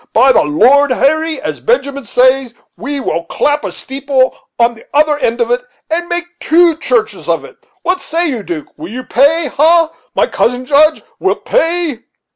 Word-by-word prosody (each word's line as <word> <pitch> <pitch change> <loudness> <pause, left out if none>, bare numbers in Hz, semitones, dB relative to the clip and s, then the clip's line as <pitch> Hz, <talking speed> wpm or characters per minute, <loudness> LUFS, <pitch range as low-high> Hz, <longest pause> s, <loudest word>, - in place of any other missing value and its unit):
By 260 +4 +5
the - - +4
Lord 255 - +4
Harry, 315 +5 +1
as - - -5
Benjamin 280 - -1
says, 255 +1 +2 0.2
we 280 +4 -4
will 170 -9 -2
clap 295 - 0
a - - -4
steeple 270 -1 -1 0.2
on 235 0 +3
the 225 - -17
other 300 0 +3
end 235 -2 -1
of 235 0 0
it, 245 +1 +1 0.3
and 345 +2 -1
make 345 0 -2
two 335 0 +3
churches 440 +5 -1
of - - 0
it. - - -18 0.2
What 360 +1 0
say 340 +2 -1
you, 255 -7 -3
'Duke, 170 -5 -6
will 160 +3 -8
you 255 +2 -6
pay? 295 +7 +2
ha! 320 +4 +3 0.2
my - - +3
cousin 250 +1 -1
Judge, 305 +3 +3 0.2
wilt - - -1
pay?" 330 - 0
280 Hz, 180 wpm, -14 LUFS, 245-325 Hz, 0.3 s, By